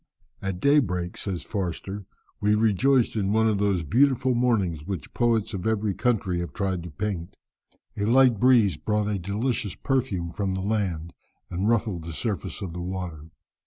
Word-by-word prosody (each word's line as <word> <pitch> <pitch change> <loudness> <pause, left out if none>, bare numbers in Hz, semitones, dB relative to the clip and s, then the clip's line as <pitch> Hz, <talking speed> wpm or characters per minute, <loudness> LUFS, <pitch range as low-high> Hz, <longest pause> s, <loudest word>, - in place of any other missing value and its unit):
"At 95 -2 -3
daybreak," 95 -10 +2
says 90 -6 -4
Forster, 95 +1 -4 0.3
"we 105 +1 +3
rejoiced 115 +4 +3
in 100 -2 0
one 110 0 +3
of 105 -2 +1
those 100 -4 +1
beautiful 130 - +3
mornings 105 -11 +1
which 95 -2 -6
poets 115 -2 +1
of 95 +1 -3
every 110 -2 +1
country 100 -6 0
have 85 - -4
tried 95 -3 -1
to 85 - -7
paint. 85 +1 -4 0.6
A 100 - -1
light 125 -1 +5
breeze 120 -6 +5
brought 105 -1 0
a 105 -2 -1
delicious 105 +2 -2
perfume 110 -11 -1
from 95 0 -2
the 95 - -2
land, 95 -6 -1 0.4
and 95 +4 0
ruffled 105 -7 0
the 85 - -6
surface 100 - -3
of 90 -4 -5
the 90 - -5
water. 90 -4 -5
100 Hz, 165 wpm, -26 LUFS, 90-115 Hz, 0.6 s, light